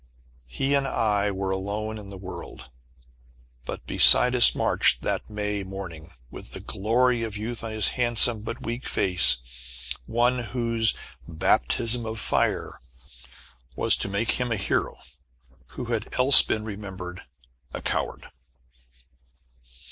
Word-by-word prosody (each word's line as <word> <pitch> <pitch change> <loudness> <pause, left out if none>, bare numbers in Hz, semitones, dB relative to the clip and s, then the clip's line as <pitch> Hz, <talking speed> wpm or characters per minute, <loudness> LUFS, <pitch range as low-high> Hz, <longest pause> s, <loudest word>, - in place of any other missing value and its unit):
He 135 - -2
and 140 -1 +1
I 105 -5 0
were 95 -1 -4
alone 105 +3 -4
in 100 -2 -11
the 100 - -10
world. 95 0 -10 0.9
But - - -7
beside 125 0 +5
us 125 -2 +6
marched, - - +2
that - - -3
May 105 -1 -4
morning, 95 -4 -9 0.2
with - - -11
the - - 0
glory 120 +4 0
of 110 -2 -5
youth 115 +2 -6
on 115 - -5
his 110 -2 -1
handsome 120 -2 +2
but 115 +2 -8
weak 120 +3 -5
face, 90 -9 +4 0.6
one 120 +2 +1
whose 115 -1 -1 0.3
"baptism 110 +7 0
of 110 0 -6
fire" - - -1 1.0
was - - +4
to - - -3
make 100 +3 -1
him 125 -1 -2
a - - +1
hero, 95 - -2 0.8
who 125 - -5
had 110 -2 -4
else 130 +2 +10
been 110 - -3
remembered 95 -4 -8 0.5
a - - -6
coward. - - -4
110 Hz, 135 wpm, -24 LUFS, 95-120 Hz, 1.0 s, else